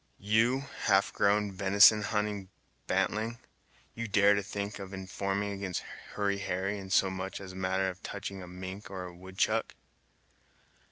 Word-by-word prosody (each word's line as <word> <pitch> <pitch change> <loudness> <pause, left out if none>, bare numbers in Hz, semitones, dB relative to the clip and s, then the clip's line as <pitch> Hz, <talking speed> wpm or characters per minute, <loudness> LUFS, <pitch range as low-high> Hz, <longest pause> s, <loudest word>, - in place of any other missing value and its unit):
"You! 115 +6 +2 0.2
half 95 +1 +3
grown, 100 0 +2
venison 100 +3 +6
hunting 105 -2 -2 0.4
bantling! 110 +2 0 0.6
You 115 0 -4
dare 100 0 +5
to 100 - +1
think 100 +1 -5
of 95 0 -7
informing 100 +1 -2
against 95 -2 -3 0.3
Hurry 100 -1 0
Harry 95 +2 -2
in 95 -1 -8
so 95 0 +3
much 95 0 -4
as 95 -1 -8
a - - -11
matter 95 0 0
touching 100 -1 -6
a 90 - -8
mink 95 +3 -7
or 95 -1 -5
a 90 -1 -8
woodchuck!" 95 +5 -1
100 Hz, 150 wpm, -31 LUFS, 95-105 Hz, 0.6 s, venison